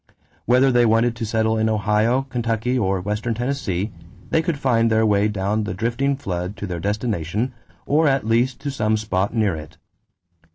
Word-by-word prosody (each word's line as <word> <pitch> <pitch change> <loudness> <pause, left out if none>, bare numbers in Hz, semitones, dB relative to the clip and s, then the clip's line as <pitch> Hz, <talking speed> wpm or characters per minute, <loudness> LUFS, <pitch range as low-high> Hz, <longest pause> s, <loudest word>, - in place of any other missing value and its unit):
Whether 130 +2 +4
they 120 -1 +4
wanted 115 +2 +2
to 115 - -3
settle 110 0 +1
in 110 0 +2
Ohio, 110 +4 +2
Kentucky, 120 -1 -1
or 95 -6 +1
western 105 +4 -2
Tennessee 110 -6 -2 0.4
they 160 - +3
could 165 -3 -2
find 120 -4 +2
their 110 0 +3
way 105 -1 +3
down 105 +1 -1
the 90 -3 -4
drifting 120 +6 0
flood 95 -7 -4
to - - -5
their 90 -3 -4
destination 105 +3 -2 0.3
or 155 +2 +3
at 135 -4 +1
least 120 +3 +1
to 140 0 -3
some 110 -4 +1
spot 100 -2 -1
near 105 -6 +1
it. 80 +1 -10
110 Hz, 175 wpm, -22 LUFS, 105-125 Hz, 0.4 s, Whether